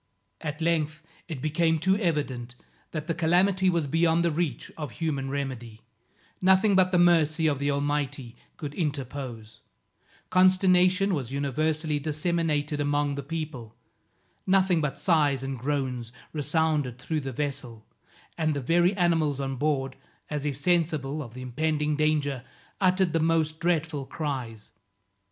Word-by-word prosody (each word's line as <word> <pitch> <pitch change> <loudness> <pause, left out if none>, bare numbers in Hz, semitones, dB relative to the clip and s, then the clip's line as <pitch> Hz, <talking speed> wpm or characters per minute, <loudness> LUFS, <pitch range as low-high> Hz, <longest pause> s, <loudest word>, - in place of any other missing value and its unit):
At 150 +1 -5
length 155 -1 0 0.2
it 155 -6 -6
became 160 +1 +2
too 190 +5 +2
evident 140 - -2 0.3
that 155 -2 -4
the 165 - -1
calamity 180 +3 +3
was 170 -4 +1
beyond 165 +3 +2
the 170 - +2
reach 150 -6 -2
of 150 -6 -6
human 140 -5 -2
remedy; 130 -5 -5 0.6
nothing 190 +3 +4
but 185 -1 +4
the 180 - +3
mercy 165 -2 +4
of 145 -3 +2
the 140 +1 0
Almighty 140 -3 -2 0.2
could 145 -3 -6
interpose; 135 - -4 0.7
consternation 185 +1 +4
was 130 -7 -3
universally 150 +2 -1
disseminated 150 -1 -1
among 145 0 +1
the 140 - -4
people; 140 -7 -6 0.7
nothing 185 -3 +3
but 145 -3 -2
sighs 145 -7 +2
and 135 -2 -4
groans 130 -3 -2 0.2
resounded 150 -3 0
through 155 +5 -2
the 135 -2 -5
vessel, 130 -5 -4 0.5
and 155 -2 +1
the - - -1
very 175 +8 +2
animals 165 -5 +2
on 135 -1 -2
board, 135 -1 -1 0.3
as 150 0 -2
if 140 -3 -2
sensible 155 -3 0
of 120 -4 -9
the 130 - -7
impending 150 +3 0
danger, 145 -4 0 0.4
uttered 185 -2 +2
the 165 - +2
most 160 -1 +1
dreadful 160 -5 -1
cries. 125 -8 -5
150 Hz, 140 wpm, -27 LUFS, 140-165 Hz, 0.7 s, nothing